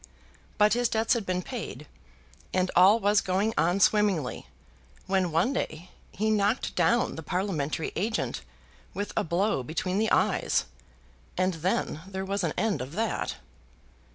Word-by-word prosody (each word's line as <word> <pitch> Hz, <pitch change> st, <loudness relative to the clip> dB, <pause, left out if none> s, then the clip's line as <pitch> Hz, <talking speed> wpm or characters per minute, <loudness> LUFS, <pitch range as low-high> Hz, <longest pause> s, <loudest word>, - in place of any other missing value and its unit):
But 210 Hz, 0 st, +5 dB
his 240 Hz, 0 st, +1 dB
debts 220 Hz, 0 st, +2 dB
had 230 Hz, -5 st, -2 dB
been 180 Hz, 0 st, -1 dB
paid; -, -, -6 dB, 0.7 s
and 185 Hz, 0 st, +1 dB
all 195 Hz, +5 st, +7 dB
was 205 Hz, -1 st, +3 dB
going 195 Hz, +4 st, 0 dB
on 175 Hz, +5 st, +2 dB
swimmingly, 200 Hz, -9 st, +2 dB, 0.6 s
when 190 Hz, -2 st, +1 dB
one 170 Hz, -, +2 dB
day 175 Hz, -, -4 dB, 0.2 s
he 215 Hz, +2 st, 0 dB
knocked 210 Hz, +3 st, +1 dB
down 240 Hz, +1 st, +2 dB
the -, -, -5 dB
parliamentary 160 Hz, -3 st, -2 dB
agent 220 Hz, +6 st, -1 dB, 0.5 s
with 205 Hz, 0 st, -3 dB
a -, -, +1 dB
blow 175 Hz, -1 st, 0 dB
between 180 Hz, +8 st, -2 dB
the 220 Hz, 0 st, +1 dB
eyes, -, -, +2 dB, 0.7 s
and 185 Hz, 0 st, +1 dB
then 165 Hz, -2 st, -1 dB
there 190 Hz, 0 st, -4 dB
was 200 Hz, +1 st, -2 dB
an -, -, 0 dB
end 220 Hz, -, 0 dB
of 130 Hz, +4 st, -7 dB
that. 225 Hz, +5 st, -2 dB
190 Hz, 150 wpm, -27 LUFS, 175-210 Hz, 0.7 s, all